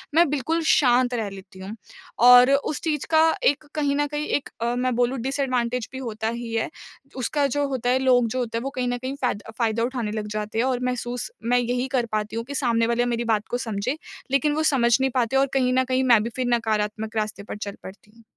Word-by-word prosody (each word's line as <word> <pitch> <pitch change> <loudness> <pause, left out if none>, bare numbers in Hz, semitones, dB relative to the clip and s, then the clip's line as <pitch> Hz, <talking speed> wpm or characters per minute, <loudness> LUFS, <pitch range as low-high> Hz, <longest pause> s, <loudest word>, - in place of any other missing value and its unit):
मैं 340 +1 +6
बिल्कुल 300 +4 -1
शांत 250 -2 +4
रह 225 -4 -2
लेती 190 -1 -12
हूँ 195 +3 -7 0.5
और 250 +1 +8
उस 280 +1 0
चीज़ 305 -4 -1
का 315 0 +5 0.2
एक 290 +2 +2
कहीं 285 -2 +1
न 290 - +2
कहीं 295 +1 -3
एक 285 - -1
अ, 235 +1 0
मैं 250 +1 0
बोलूँ 245 +2 +1
डिसएडवांटेज 250 -3 -1
भी - - -5
होता 225 -3 -3
ही 235 0 -5
है। 225 - 0 0.5
उसका 280 +3 0
जो 285 +2 0
होता 250 -2 -1
है, 260 - +3
लोग 250 -2 +3
जो 255 +3 -3
होते 230 -2 -2
हैं - - -7
वो 270 - -2
कहीं 250 -1 -1
न 245 - -1
कहीं 260 +2 -4
फ़ायदा 220 -4 -2
फ़ायदा 230 -1 +1
उठाने 240 -3 -2
लग 215 -1 -4
जाते 215 +1 -4
हैं 240 - +2
और 255 -2 0
महसूस 245 -1 -3 0.2
मैं 245 +1 +3
यही 245 +1 -1
कर 240 - +1
पाती 215 0 -2
हूँ 230 - -2
कि 280 +3 -7
सामने 230 -4 +1
वाले 235 +1 +1
मेरी 240 -1 -1
बात 210 0 -1
को 245 - 0
समझे। 225 +3 -3 0.3
लेकिन 285 +2 +2
वो 310 - 0
समझ 235 -3 +4
नहीं 265 - +2
पाते 245 0 +1
और 270 +1 +3
कहीं 255 -2 +2
न 260 0 +3
कहीं 260 0 +1
मैं 215 -2 +5
भी 230 - -3
फ़िर 255 -1 -1
नकारात्मक 215 -1 -2
रास्ते 215 -1 -2
पर 210 - -7
चल 205 -1 -6
पड़ती 200 +2 -12
हूँ। 230 - -19
245 Hz, 240 wpm, -24 LUFS, 225-265 Hz, 0.5 s, और